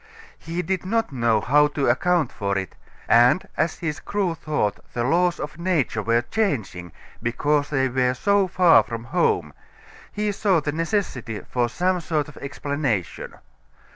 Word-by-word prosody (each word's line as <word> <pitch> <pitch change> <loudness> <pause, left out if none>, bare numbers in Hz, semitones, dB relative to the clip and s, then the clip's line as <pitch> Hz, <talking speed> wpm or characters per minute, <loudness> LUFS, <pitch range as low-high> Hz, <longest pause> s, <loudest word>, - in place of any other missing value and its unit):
He 170 +2 -4
did 185 +1 -2
not 225 +2 -1
know 120 -4 +2
how 150 +6 +4
to 140 - +1
account 155 +4 +2
for 100 -2 -2
it, 95 -4 -5 0.3
and 120 +9 +4
as 160 +1 0
his 160 -2 -3
crew 195 -3 -1
thought 150 -10 -2
the 120 - -1
laws 175 +6 +2
of 150 +2 -6
nature 165 -11 0
were 115 +3 +1
changing 120 - -2 0.3
because 145 +5 0
they 135 -2 +1
were 125 0 +1
so 200 +7 +2
far 180 -2 +5
from 115 -1 -6
home 165 +8 0 0.6
he 210 0 -1
saw 200 -3 +2
the 145 -1 -2
necessity 155 - -2
for 120 -1 -1
some 180 +6 0
sort 155 -3 -1
of 150 - -13
explanation. 140 - -3
150 Hz, 155 wpm, -23 LUFS, 120-180 Hz, 0.6 s, far